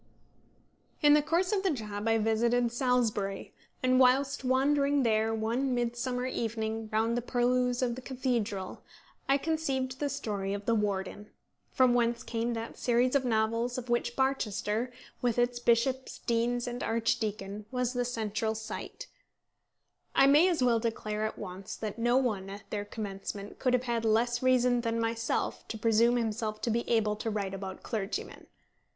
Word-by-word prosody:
In 295 0 +7
the 300 - +6
course 335 +6 +1
of 410 -2 +1
the 385 - +1
job 215 - -3
I 225 0 +4
visited 230 +2 +2
Salisbury, 235 -6 0 0.3
and 255 0 +4
whilst 265 +2 +3
wandering 280 +2 +2
there 220 -1 +2
one 235 +4 0
midsummer 245 +1 -1
evening 225 -3 -3
round 225 +2 +1
the 240 - 0
purlieus 250 +1 +1
of 240 -1 +1
the 255 - -7
cathedral 235 -7 -2 0.5
I 275 - +5
conceived 270 -4 -2
the 290 - 0
story 200 -5 -3
of 205 0 -7
The 230 - +2
Warden, 205 -1 -2 0.4
from 255 -3 +4
whence 235 -1 +1
came 235 +1 -2
that 225 0 -6
series 245 +1 +2
of 280 -2 +3
novels 230 +1 0
of 250 -1 -5
which 240 0 0
Barchester, 245 -3 0 0.3
with 245 -2 +1
its 245 0 +1
bishops, 250 +3 +1
deans, 240 +1 0
and 245 0 -4
archdeacon, 215 -2 -1
was 250 0 -1
the 245 -1 0
central 220 -2 -2
site. 220 0 -6 1.1
I 270 - +6
may 295 +6 +6
as 330 -7 +1
well 235 -2 +4
declare 215 -2 -2
at - - -8
once 190 0 -7
that 215 +1 -5
no 240 +2 +3
one 210 -7 0
at 200 +1 -9
their 205 -1 -2
commencement 200 -1 -6
could 255 -2 +1
have 250 - 0
had 235 -2 -1
less 235 +2 +2
reason 250 -1 +3
than 230 -1 -1
myself 230 0 -1
to 220 - -5
presume 230 +2 +3
himself 220 -2 -2
to 230 - 0
be 235 +2 -1
able 215 -3 +2
to 225 - -3
write 200 -3 -2
about 190 -1 -6
clergymen. 210 -3 -4
235 Hz, 165 wpm, -30 LUFS, 220-250 Hz, 1.1 s, In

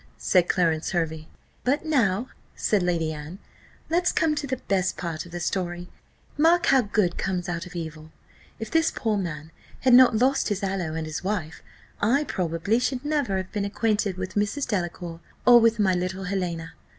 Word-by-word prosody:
said 180 -2 +2
Clarence 165 -1 +1
Hervey. 160 -2 -2 0.4
"But 280 +5 0
now," 245 -6 +1 0.3
said 210 -3 +1
Lady 170 -3 0
Anne, 150 +4 -8 0.5
"let's 350 +2 +2
come 320 -1 +2
to 295 -1 -3
the 260 0 -2
best 190 -5 -1
part 170 -1 -4
of - - -15
the 175 - -5
story 175 0 -3 0.5
mark 335 +3 +4
how 270 -1 +5
good 205 -5 0
comes 180 -2 -2
out 175 0 -3
of 180 - -13
evil. 160 -2 -6 0.5
If 220 -1 -6
this 325 0 +3
poor 220 -2 -1
man 160 -5 -4 0.3
had 255 -1 +4
not 250 -3 +7
lost 265 +3 +2
his 205 -1 -2
aloe 190 -5 -2
and 160 -1 -3
his 155 +2 -5
wife, 185 -5 -3 0.4
I 255 +8 +3
probably 180 - 0
should 250 +2 -2
never 290 -10 0
have 185 0 -5
been 205 -2 -2
acquainted 205 -1 0
with 185 0 -5
Mrs. 210 +7 -1
Delacour, 175 -4 -3 0.3
or 245 -1 +9
with 230 0 +4
my 195 -3 +3
little 185 +2 -2
Helena. 175 -4 -3
190 Hz, 180 wpm, -25 LUFS, 175-235 Hz, 0.5 s, or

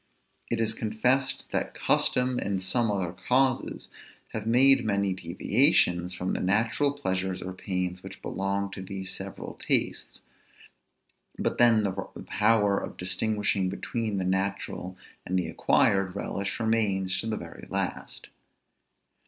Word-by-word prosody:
It 115 - -1
is 110 -1 +2
confessed, 125 +6 0
that - - -2
custom 125 0 +2
and 95 -1 -2
some 115 +5 +1
other 95 -4 -1
causes 130 +5 0 0.4
have 110 0 -5
made 135 +4 +6
many 100 -2 +1
deviations 90 - +2
from 90 0 -2
the - - -1
natural 110 +9 +2
pleasures 95 -9 -2
or 95 0 -6
pains 90 -1 -3
which 95 0 -11
belong 100 +1 -2
to 95 - -7
these 95 0 -5
several - - -7
tastes; - - -1 1.1
but - - -2
then 115 -3 +5
the 100 - 0 0.3
power 105 -3 +3
of - - -7
distinguishing 95 +1 0
between 110 +2 -3
the 95 - -1
natural 95 -1 -2 0.3
and 95 - -1
the 90 -3 0
acquired 95 +3 +2
relish 100 +1 -3
remains 105 -5 +1
to - - -3
the 110 -1 -1
very 85 -1 -10
last. - - -3
100 Hz, 135 wpm, -27 LUFS, 95-115 Hz, 1.1 s, made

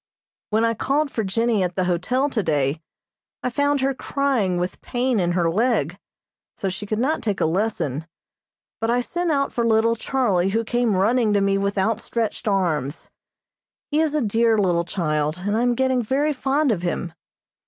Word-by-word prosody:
When 220 +2 +2
I 230 - +2
called 280 +5 0
for 225 - -2
Jennie 225 +2 +1
at 180 -1 -1
the 185 - +1
hotel 180 +10 0
today 155 - 0 0.6
I 250 - -1
found 285 +1 +1
her 270 +1 +1
crying 260 -9 0
with 180 +1 -3
pain 245 -2 0
in 175 -1 +1
her 175 -2 +1
leg, 190 - 0 0.6
so 195 - -2
she 190 +3 -6
could 215 - -1
not 275 +8 0
take 205 -3 -1
a - - +2
lesson, 160 - -1 0.7
but 225 - -1
I 245 +1 +2
sent 345 +7 -2
out 275 -2 0
for 235 - 0
little 230 0 +3
Charlie 215 -7 +1
who 225 +3 0
came 240 -2 +1
running 215 +3 +2
to 205 - +3
me 195 0 +2
with 200 +1 -1
outstretched 225 +3 -1
arms. 165 -8 -1 0.8
He 300 - +2
is 315 -2 +1
a 300 - +2
dear 225 +1 +2
little 175 -4 +2
child, 155 -3 -1
and 205 +1 0
I 225 - +1
am 245 0 +2
getting 260 0 +1
very 275 +6 0
fond 275 +1 +1
of 190 -6 -1
him. 175 -1 -3
220 Hz, 185 wpm, -22 LUFS, 185-250 Hz, 0.8 s, little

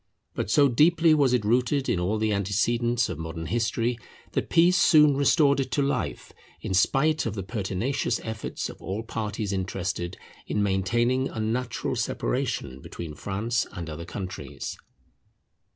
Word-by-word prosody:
But - - -3
so 140 +5 +5
deeply 160 +5 +4
was 140 -4 +3
it 125 -4 +1
rooted 125 +5 +1
in 95 - +1
all 95 +5 0
the 110 0 +1
antecedents 115 +4 +1
of 85 -4 -5
modern 80 0 -5
history 115 +3 0 0.3
that - - -2
peace 175 +2 +5
soon 150 -6 +6
restored 140 0 +4
it 135 -1 -1
to 145 - +2
life, 140 - -2 0.3
in - - -4
spite 135 +10 +2
of 110 - -3
the 95 - -4
pertinacious 100 +5 -2
efforts 110 -1 -4
of - - -11
all 100 +4 -4
parties 105 -2 -3
interested 95 -2 -3 0.3
in 105 - 0
maintaining 120 +7 +1
unnatural 115 +2 -2
separation 65 +2 -2
between 80 +1 -7
France 110 +8 -2
and 85 -5 -6
other 80 +2 -6
countries. 90 0 -6
110 Hz, 150 wpm, -26 LUFS, 95-130 Hz, 0.3 s, soon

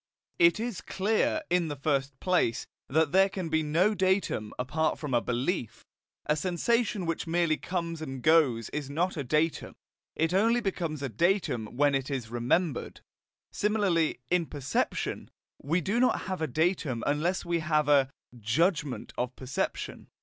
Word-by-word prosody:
It 170 +4 +5
is 230 -3 -3
clear, 215 +10 0
in 175 -2 +2
the 145 - -4
first 140 -1 -1
place, 180 -11 +1 0.2
that 155 +1 +2
there 195 +2 +5
can 185 -3 -4
be 160 0 +2
no 165 +8 +2
datum 190 - 0
apart 155 +5 0
from 145 -4 -5
a 120 - +3
belief. 125 - -2 0.4
A 150 - +2
sensation 190 +5 0
which 165 +1 -2
merely 165 -1 +2
comes 170 -1 -4
and 135 -5 -6
goes 145 -8 +3
is 145 -2 -4
not 175 +6 0
a 145 - -3
datum; 150 +3 0 0.4
it 165 +2 0
only 225 +5 +3
becomes 170 - -3
a 135 - -2
datum 120 - 0
when 145 0 +4
it 135 0 -1
is 125 -5 -4
remembered. 125 +6 -1 0.5
Similarly, 200 - +1
in 175 -2 +2
perception, 140 0 -2 0.3
we 165 +6 0
do 205 +8 0
not 255 - +3
have 185 -3 -4
a 160 - +1
datum 155 -4 0
unless 160 +6 0
we 170 -1 0
have 155 -2 +1
a 140 -2 +4 0.3
JUDGMENT 150 - 0
of 125 +1 -2
perception. 130 -1 -4
160 Hz, 155 wpm, -29 LUFS, 135-180 Hz, 0.5 s, It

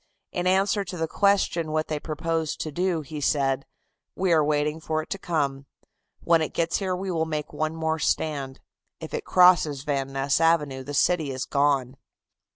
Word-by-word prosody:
In 180 0 -1
answer 195 +2 +2
to 180 -1 -7
the 160 -1 -1
question 195 -4 +1
of 155 - -5
what 155 0 0
they 155 -1 -2
proposed 160 0 -2
to 155 - -4
do, 175 +1 0
he 150 +1 -7
said: 135 -2 +1 0.5
"We 185 -2 +1
are 155 -2 +4
waiting 150 +1 0
for 155 -1 -2
it - - -18
to 195 - -3
come. 140 -6 -2 0.5
When 165 -1 +3
it 155 - -3
gets 170 0 +1
here 190 -2 -1
we 190 +1 -4
will 160 -2 0
make 150 -1 -4
one 155 +1 -2
more 160 0 -1
stand. 140 -4 -1 0.4
If - - -8
it - - -3
crosses 175 -6 +4
Van 135 -2 -2
Ness 135 +3 0
Avenue 150 -5 +2
the 145 +2 -6
city 160 0 +2
is 130 -1 -3
gone." 140 -2 +1
155 Hz, 190 wpm, -25 LUFS, 145-170 Hz, 0.5 s, are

